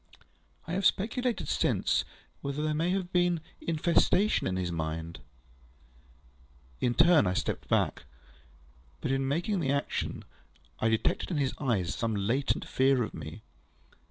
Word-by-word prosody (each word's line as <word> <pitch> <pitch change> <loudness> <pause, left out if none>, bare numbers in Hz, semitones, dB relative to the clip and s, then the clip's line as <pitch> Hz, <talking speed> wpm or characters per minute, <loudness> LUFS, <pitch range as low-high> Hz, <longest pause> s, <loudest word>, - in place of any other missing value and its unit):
I 165 - -5
have 195 +2 -1
speculated 230 +6 +1
since, - - +1 0.4
whether 140 +1 -3
there 155 0 0
may 165 +3 0
have 185 -1 -2
been 175 -1 +3 0.2
infection 170 +5 +2
in 95 - -1
his 90 -2 -2
mind. 80 -1 -4 1.6
In 120 -1 +1
my 160 - +7
turn, 170 - +5
I 90 - 0
stepped - - -2
back. - - +1 0.9
But - - -2
in 135 0 0
making 175 +8 0
the 145 -5 -1
action, 140 0 -2 0.5
I 110 - +2
detected 110 0 0
in 170 - -1
his 140 -2 0
eyes 110 - 0
some 115 -2 -1
latent 115 +8 0
fear 130 -1 +3
of - - -5
me. - - -8
140 Hz, 145 wpm, -29 LUFS, 110-175 Hz, 1.6 s, my